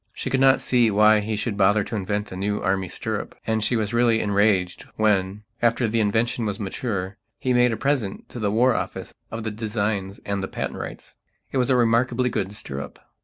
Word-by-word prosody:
She - - -5
could 135 - +2
not 135 0 +5
see 120 -3 +3
why 105 +1 +5
he 110 +1 -2
should 105 +1 -2
bother 100 +1 +3
to 115 - -5
invent 105 +1 -2
a - - -6
new 105 +2 -1
Army 95 -1 0
stirrup, - - -4
and 110 -1 0
she 120 - +1
was 110 -1 -1
really 120 -1 +3
enraged 100 -3 +1
when, 105 -1 +1 0.2
after 120 0 +2
the 115 +1 0
invention 110 +3 +1
was 105 -3 -2
mature, 100 -1 -3 0.2
he 130 -2 0
made 125 0 +4
a 110 - -2
present 130 -7 -1
to 120 - -7
the 105 -2 0
War 120 +5 +3
Office - - -4 0.2
of 115 0 -5
the 110 - -2
designs 105 -2 -2
and 100 -1 -2
the 95 - -3
patent - - -4
rights. - - -8 0.4
It 135 - 0
was 125 - +1
a 130 - +4
remarkably 125 +1 +2
good 95 -1 -2
stirrup. 70 -9 -7
110 Hz, 210 wpm, -24 LUFS, 100-120 Hz, 0.4 s, not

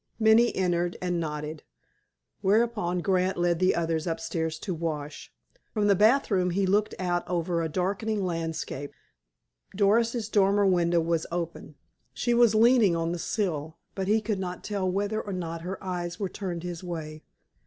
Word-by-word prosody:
Minnie 225 +1 +4
entered, 175 -1 0
and 180 -1 -1
nodded, 150 -1 -4 0.8
whereupon 205 -3 +1
Grant 185 0 +1
led 175 -1 +1
the 185 0 +3
others 165 -1 -1
upstairs 165 -1 -2
to 185 +3 -4
wash. 155 -3 -5 0.4
From 210 -1 +2
the 205 - +5
bathroom 205 -3 +3
he 190 +2 +1
looked 205 +3 +1
out 175 -1 -1
over 170 -1 0
a 165 - -2
darkening 195 +4 -1
landscape. 165 -5 -4 0.8
Doris's 225 +3 +2
dormer 200 -1 +3
window 175 -2 +3
was 165 0 -1
open. 170 -3 -5 0.4
She 240 - 0
was 235 -2 +5
leaning 225 -5 +5
on 165 0 -1
the 175 - -3
sill, 160 -6 -2 0.2
but 190 -1 -3
he 215 +2 +3
could 215 -2 -2
not 180 -1 -5
tell 200 -3 -1
whether 205 +3 -1
or 200 - -6
not 165 -2 -4
her 185 +3 -5
eyes 175 0 -4
were 195 -3 -2
turned 180 -4 -5
his 175 -1 -5
way. 155 -3 -6
180 Hz, 160 wpm, -27 LUFS, 170-205 Hz, 0.8 s, the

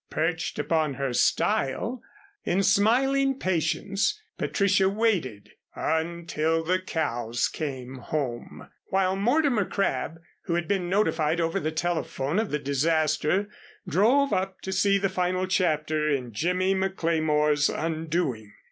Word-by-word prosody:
Perched 165 +1 -1
upon 155 -4 0
her 135 -1 -2
stile, 220 - +1 0.4
in 190 +3 +1
smiling 265 +7 +3
patience 195 - 0 0.2
Patricia 195 -1 +2
waited 195 - -1 0.2
"until 165 0 -1
the 180 +3 +1
cows 120 -10 -1
came 130 -4 -5
home," 125 -3 -4 0.2
while 190 0 +1
Mortimer 245 +2 +2
Crabb, 180 -5 -2 0.3
who 170 - -1
had 170 -1 -1
been 190 -3 -1
notified 170 -5 +1
over 165 +3 0
the 155 -3 -2
telephone 160 -1 -1
of 220 - -1
the 150 - 0
disaster, 155 +6 +1 0.4
drove 260 +9 +3
up 190 0 -1
to 190 - -5
see 200 +1 +3
the 195 0 +1
final 185 0 -1
chapter 155 -4 +1
in 125 -5 -2
Jimmy 180 - +1
McLemore's 160 -6 +1
undoing. 155 -9 -2
170 Hz, 120 wpm, -26 LUFS, 150-195 Hz, 0.4 s, smiling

